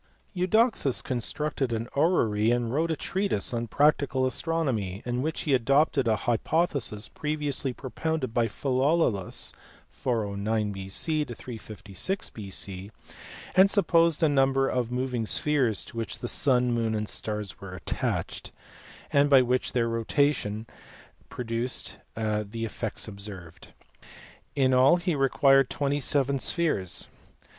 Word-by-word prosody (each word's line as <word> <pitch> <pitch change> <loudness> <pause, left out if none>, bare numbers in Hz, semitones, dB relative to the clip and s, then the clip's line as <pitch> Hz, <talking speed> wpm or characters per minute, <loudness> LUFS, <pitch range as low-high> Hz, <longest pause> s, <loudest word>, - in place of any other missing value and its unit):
Eudoxus 185 - +2
constructed 135 +2 -2
an 115 0 -2
orrery, 115 - +2
and 120 -1 0
wrote 160 +4 +1
a 160 - +1
treatise 180 - -1
on 120 0 -2
practical 140 -1 +2
astronomy, 130 - -1
in 125 0 -1
which 155 +3 -2
he 145 - 0
adopted 135 +1 +3
a 110 - +3
hypothesis 120 -3 0
pre 155 0 -3
viously 145 -2 -1
propounded 130 0 -3
by 115 -1 +2
Philolaus 130 - 0 0.4
(409 105 -2 -1
B.C. 100 - -1
356 115 - -5
B.C.), 100 -1 -4 0.6
and 190 +1 +6
supposed 170 -5 +3
a - - +6
number 135 -1 +3
of 125 -2 -1
moving 125 -3 -2
spheres 130 - +1
to - - -13
which 115 - -3
the 120 - -5
sun, 125 -1 +2
moon, 115 -2 0
and 105 0 -2
stars 105 -2 -4
were 95 -2 -7
attached, 90 - -3 0.6
and 145 0 +4
which 130 -2 +4
by - - -2
their 115 -1 +2
rotation 115 -2 0 0.6
produced 120 +1 -3 0.2
the 110 0 -2
effects 110 0 -4
observed. 100 -5 -9 0.9
Jn 130 -2 +4
all 130 +6 +6
he 175 0 -1
required 135 -1 +4
twenty 145 0 -1
seven 140 0 +1
spheres. 140 - 0
125 Hz, 125 wpm, -27 LUFS, 110-145 Hz, 0.9 s, and